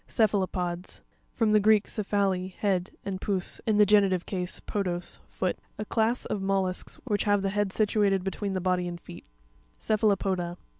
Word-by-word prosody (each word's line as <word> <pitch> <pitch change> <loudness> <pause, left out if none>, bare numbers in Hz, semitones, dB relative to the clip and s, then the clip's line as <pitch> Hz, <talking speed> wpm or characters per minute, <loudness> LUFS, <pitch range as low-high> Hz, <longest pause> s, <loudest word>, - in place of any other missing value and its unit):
A - - -19
Ce'puaropops 225 - +3
(ke'f 215 - +3
a - - +3
lo 185 - 0
pods)—From 180 +5 -3
the 215 - +6
Greek, 215 0 +5
kephale, 195 -3 -1
head, 190 -3 0 0.2
and 190 -1 -4
pous, 190 -3 -2
in 215 -2 +3
the 210 - +7
genitive 195 -3 +3
case, 180 -2 -4
podos, 180 -4 -3
foot. 185 -2 -2 0.2
A 210 - -4
class 225 +3 +1
of 205 - -2
mollusks 195 -1 -1
which 210 -6 -1
have 205 -1 +2
the 195 - +1
head 205 -1 0
situated 205 -2 +2
between 195 +1 -3
the - - 0
body 180 -1 +1
and 175 -1 -5
feet 85 - -12 0.5
(page 215 -1 0
19). 215 - +6
Cr'pHaLopo'pa. 180 -3 -2
195 Hz, 195 wpm, -28 LUFS, 185-210 Hz, 0.5 s, the